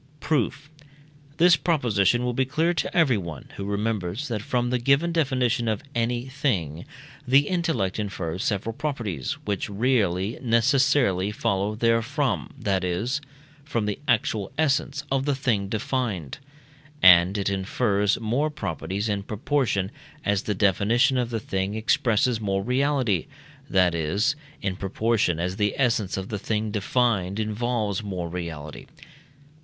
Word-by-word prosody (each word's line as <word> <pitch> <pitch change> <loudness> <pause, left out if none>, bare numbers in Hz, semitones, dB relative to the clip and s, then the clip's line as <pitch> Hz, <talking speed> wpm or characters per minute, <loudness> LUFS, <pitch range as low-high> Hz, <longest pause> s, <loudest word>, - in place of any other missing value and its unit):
Proof. 145 0 -1 0.7
This 175 +1 +6
proposition 125 - +2
will 125 0 -1
be 130 - +2
clear 155 +6 +1
to 175 - -2
everyone, 100 - +1
who 100 - -4
remembers 105 +3 -2
that 110 -4 -2
from 120 -1 -1
the 125 - +1
given 140 +7 +3
definition 130 -6 +1
of 110 +5 -1
any 120 +1 -1
thing 105 - -2 0.4
the 135 +2 +6
intellect 160 - -1
infers 95 -4 -3
several 110 +2 -1
properties, 115 - -3
which 100 -1 -2
really 100 -3 0
necessarily 125 -4 +3
follow 105 -1 -1
therefrom 120 +5 0
(that 100 -8 0
is, 110 +11 -1 0.4
from 120 -7 -2
the 105 -1 -2
actual 110 -5 +1
essence 145 -1 +1
of 135 0 +1
the 145 -2 +1
thing 110 -7 0
defined); 110 - -2 0.6
and 90 +2 +7
it 100 - -1
infers 100 +1 +1
more 120 +7 0
properties 100 - -3
in 100 -2 -1
proportion 105 -2 -1 0.3
as 100 -1 +2
the 105 - -2
definition 110 +7 +3
of 120 -2 -1
the 115 -2 -2
thing 95 0 -2
expresses 115 +1 +1
more 95 -2 -1
reality, 125 - +1 0.4
that 90 -2 +3
is, 100 - 0 0.3
in 95 -1 -1
proportion 100 -2 0
as 90 +2 -2
the 105 -1 +1
essence 115 -8 +1
of 95 0 -5
the 105 - -3
thing 110 +1 -2
defined 105 -2 0
involves 110 -2 -1
more 90 -5 -4
reality. 80 -4 -6
110 Hz, 140 wpm, -25 LUFS, 95-130 Hz, 0.7 s, and